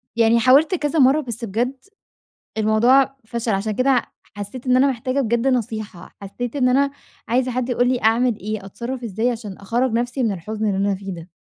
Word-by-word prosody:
يعني 230 0 +4
حاولت 275 - +5
كذا 300 -1 -1
مرّة 275 +3 +5
بس 235 -3 -5
بجد 235 +6 -1 0.8
الموضوع 245 +6 +3
فَشَل 235 0 -3
عشان 200 +2 -1
كده 255 +2 +2 0.3
حسّيت 205 +6 -7
إن 255 0 +4
أنا 270 +2 +4
محتاجة 255 +2 -2
بجد 235 0 0
نصيحة، 215 -7 -3
حسّيت 235 +6 -5
إن 255 -2 +3
أنا 275 +2 +3 0.4
عايزة 250 +2 +1
حد 250 0 -2
يقول 245 0 +1
لي 250 -1 0
أعمل 230 +1 +3
إيه، 210 0 -5
أتصرّف 245 +5 -6
إزاي 225 +3 -1
عشان 220 -5 -6
أخرّج 235 +5 -1
نفسي 245 +3 -1
من 225 -4 +1
الحُزن 215 +4 -4
اللي 200 -2 0
أنا 200 0 +1
فيه 195 0 -7
ده؟ 170 +1 -11
235 Hz, 190 wpm, -21 LUFS, 215-255 Hz, 0.8 s, حاولت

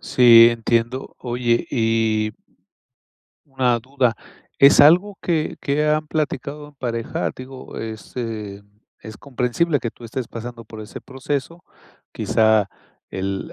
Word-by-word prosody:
Sí, 115 -2 +7
entiendo. 115 +2 -2
Oye, 120 -1 -1
y 110 -3 +1 1.1
una 130 -4 0
duda, 130 -1 -1 0.4
¿es 140 +1 +7
algo 180 +7 +5
que 160 -3 -1
que 150 +2 0
han 155 0 +1
platicado 150 -1 -4
en 145 - -20
pareja? 115 -3 -3
Digo, 130 0 -10
es, 110 -1 -8
eh, 105 -4 -5 0.4
es 110 -1 -10
comprensible 140 +4 -1
que 115 - -4
tú 120 - -16
estés 120 +1 -5
pasando 115 0 -8
por 110 0 -11
ese 105 - -9
proceso. 140 +5 -5 0.5
Quizá, 110 -2 +2 0.4
el 95 0 -4
120 Hz, 125 wpm, -21 LUFS, 115-140 Hz, 1.1 s, Sí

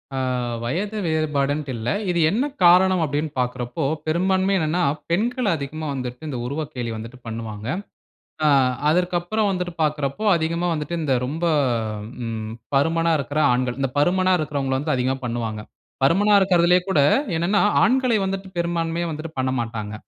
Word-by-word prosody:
அ - - -2 0.5
வயது 200 - -2
வேறுபாடுன்ட்டு 150 -3 0
இல்ல. 115 +1 -5 0.2
இது 175 -1 +1
என்ன 235 - +1 0.2
காரணம் 180 +1 +6
அப்படினு 150 +2 -2
பார்க்குறப்போ, 125 +3 -2 0.2
பெரும்பான்மை 190 +4 +2
என்னனா, 165 +3 0 0.3
பெண்கள் 235 +6 0
அதிகமா 155 +2 -5
வந்துட்டு, 125 -1 -5
இந்த 130 -4 -4
உருவக்கேலி 140 -4 -4
வந்துட்டு 115 +3 -8
பண்ணுவாங்க. 110 -1 -6 0.8
அ - - +5 0.4
அதற்கப்புறம் 180 +5 +1
வந்துட்டு 180 -2 -3
பார்க்குறப்போ, 150 +4 -1
அதிகமா 170 +2 -1
வந்துட்டு 150 +2 -3
இந்த 140 -4 +1
ரொம்ப, 155 +6 -4 0.8
ம் 110 -1 -4 0.2
பருமனா 165 +3 +2
இருக்கிற 145 +3 -2
ஆண்கள், 125 0 -1
இந்த 135 - +1
பருமனா 185 +4 +3
இருக்கிறவங்கள 140 -3 -1
வந்து 150 -1 0
அதிகமா 130 +1 0
பண்ணுவாங்க. 115 -3 -3 0.4
பருமனா 200 +9 +4
இருக்கிறதிலே 180 -2 +4
கூட 155 - +2 0.4
என்னனா 175 +5 +2 0.2
ஆண்களை 250 0 +3
வந்துட்டு 190 0 -3
பெரும்பான்மையா 170 0 -1
வந்துட்டு 155 +1 -6
பண்ணமாட்டாங்க. 115 -5 -2
155 Hz, 135 wpm, -22 LUFS, 130-180 Hz, 0.8 s, காரணம்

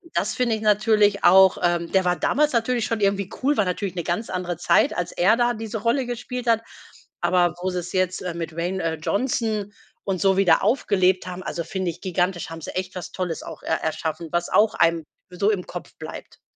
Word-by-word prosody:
Das - - 0
finde 240 -3 +1
ich 215 - -6
natürlich 210 -1 +3
auch 190 0 +7
ähm, 175 -1 +1
der 190 -1 +3
war 180 -1 +1
damals 300 +3 +2
natürlich 235 0 0
schon 230 - -2
irgendwie 200 -1 +1
cool. 285 +3 +2
War 215 - +3
natürlich 185 0 -3
‘ne 175 - -3
ganz 175 +8 -2
andere 180 -2 -3
Zeit, 175 - +3
als 180 -1 -2
er 205 +6 +3
da 240 0 +2
diese 225 0 -5
Rolle 235 +5 0
gespielt 245 +1 -5
hat. 225 -1 +3 0.6
Aber 175 -1 +2
wo 185 - -1
sie's 180 -1 -4
jetzt, 185 -1 0
äh, 180 -2 -4
mit 165 -1 -5
Dwayne, 175 +3 -3
äh, 165 -1 0
Johnson 215 - -1 0.3
und 190 -2 -2
so 195 0 +3
wieder 195 -2 +4
aufgelebt 190 -5 +2
haben 180 0 -6
also, 170 - -4
finde 185 +1 -3
ich - - -15
gigantisch. 180 -1 -1
Haben 165 0 -8
sie - - -7
echt 185 0 -3
was 180 - -6
Tolles 180 -3 -3
auch - - -10
er 160 - 0
erschaffen. 160 +1 -3
Was 175 0 -1
auch 215 +1 +4
einem 165 -1 +2 0.3
so 185 +3 0
im 200 -4 -1
Kopf - - -8
bleibt. - - -10
190 Hz, 215 wpm, -23 LUFS, 175-215 Hz, 0.6 s, auch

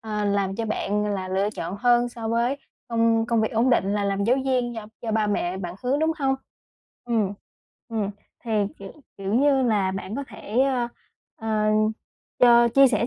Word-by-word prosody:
à, 210 -1 -3
làm 200 -1 0
cho 230 - -2
bạn 210 -1 -1
là 185 -1 -4
lựa 195 +2 0
chọn 200 -3 -5
hơn 240 +1 +3
so 230 -2 -6
với 235 +4 +1 0.3
công 230 -1 +2
công 235 -1 +2
việc 220 - 0
ổn 230 +3 +3
định 200 -5 +2
là 205 -1 0
làm 200 0 0
giáo 245 +4 +3
viên 250 -2 0
do 220 -2 -6 0.2
do 230 - -2
ba 215 -1 +2
mẹ 190 -3 -1
bạn 175 -2 -5
hướng, 260 +3 +1
đúng 320 +1 +2
hông? 270 -2 +2 0.7
Ừm, 220 -5 0 0.6
ừm. 220 -4 -2 0.3
Thì 235 - -5 0.3
kiểu 195 -1 -9 0.2
kiểu 195 +1 -2
như 270 +1 +4
là 210 -6 +2
bạn 195 +3 -5
có 280 - -3
thể, 220 +5 -2
ơ, 260 -3 +1 0.5
ờ, 215 -1 0 0.7
cho 235 -1 +6
chia 275 +3 +6
sẻ 235 -1 +1
225 Hz, 195 wpm, -24 LUFS, 200-245 Hz, 0.7 s, cho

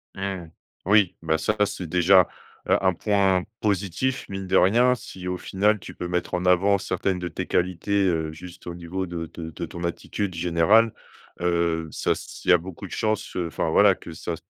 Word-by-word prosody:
Mmh. 95 -4 -4 0.4
Oui, 100 -1 +4
bah, 80 0 +1
ça 105 - 0
c'est 90 -3 -5
déjà, 90 +2 +5 0.4
heu, - - +5
un 95 -1 +4
point 95 -1 +2 0.2
positif, 105 +6 -1
mine 95 0 -5
de 95 - 0
rien, 120 +7 +5
si 95 -5 -9
au 90 0 -2
final 105 +2 +1
tu - - -10
peux 90 - -5
mettre 90 0 -2
en 90 +1 -2
avant 95 +2 +4
certaines 95 0 -1
de 90 - -3
tes - - -5
qualités, 95 +3 0
heu, 80 -3 0
juste 90 +2 -12
au 85 - -5
niveau 90 +2 -4
de 85 -1 -4
de 80 -1 -6
de 80 - -5
ton 85 0 -8
attitude 90 +2 -3
générale. 90 +7 +3 0.5
Heu, 85 -2 0
ça, - - 0
s'il - - -3
y - - +9
a - - +7
beaucoup 95 +3 -9
de - - -10
chance, 110 -2 -2
heu, 90 -2 -1
enfin 80 0 -2
voilà, 100 0 +6
que 85 - -11
ça 85 +1 -4
90 Hz, 200 wpm, -24 LUFS, 85-100 Hz, 0.5 s, y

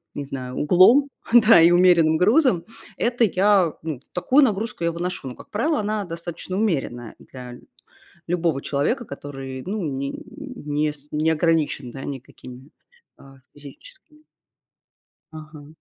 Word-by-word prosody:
не 145 - -5
знаю, 130 -2 -7
углом, 185 - +5 0.3
да, 225 -6 +7
и 170 +1 +6
умеренным 175 -3 +4
грузом- 215 - +3 0.3
это 240 0 0
я, 195 -4 +3
ну, 155 -6 -4
такую 260 +11 +3
нагрузку 215 -5 -1
я 170 - +1
выношу. 175 -4 -4
Но, 125 - -9
как - - -15
правило, 295 +9 0
она 210 0 -2
достаточно 170 +2 -6
умеренная 135 - -2
для 125 -2 -11
ль - - -13 0.7
любого 165 -5 0
человека, 180 - -1
который, 135 -3 -8
ну, 200 +1 -3
не 140 -2 -3 0.2
не 155 - -3
с 145 0 -13
не 155 +2 +1
ограничен, 155 -5 0
да, 135 - -8
никакими, 130 0 -10 0.5
а, 135 -1 -17 0.2
физическими 300 - -15 1.1
Ага. 155 -2 -11
165 Hz, 135 wpm, -22 LUFS, 140-205 Hz, 1.1 s, да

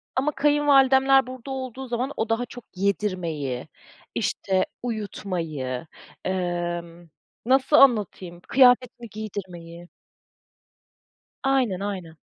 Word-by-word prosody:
ama 275 +3 +1
kayınvalidemler 270 -2 +4
burada 255 +1 -8
olduğu 260 0 -5
zaman, 245 +3 -2
o 220 - -1
daha 225 +2 0
çok 245 -1 -12
yedirmeyi, 175 -9 -2 0.5
işte 190 -1 0 0.2
uyutmayı, 165 - -4 0.4
ımm, 175 -2 -3 0.4
nasıl 265 +4 +3
anlatayım 200 -8 +3
kıyafetini 250 -2 +4
giydirmeyi. 180 -5 -8 1.6
Aynen 260 -9 +1
aynen. 185 -5 -5
210 Hz, 90 wpm, -24 LUFS, 175-260 Hz, 1.6 s, kayınvalidemler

